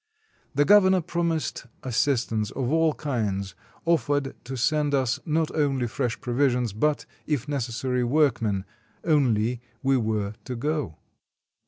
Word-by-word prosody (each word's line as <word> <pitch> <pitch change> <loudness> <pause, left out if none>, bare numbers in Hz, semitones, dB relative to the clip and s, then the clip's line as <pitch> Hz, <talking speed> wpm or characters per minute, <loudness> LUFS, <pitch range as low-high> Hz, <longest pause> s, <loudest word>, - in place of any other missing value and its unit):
The 145 +1 +4
gov 205 +1 +7
ernor 185 -4 +2
promised 165 -6 -2 0.2
assistance 115 -4 0
of 130 -1 -2
all 160 -1 +3
kinds, 105 -8 -2 0.3
offered 145 -4 +1
to 130 +1 -5
send 145 +3 +2
us 130 -3 +1
not 160 0 0
only 140 -5 +1
fresh 120 0 -2
provisions, 125 -3 +1
but, 150 +8 0 0.2
if 145 -3 -1
necessary, 125 -2 -1
workmen 120 -8 +1 0.2
— - - -36
only 125 -7 +2 0.2
we 135 0 +3
were 110 -3 -1
to 125 - -4
go. 145 - -2
130 Hz, 135 wpm, -26 LUFS, 115-150 Hz, 0.3 s, gov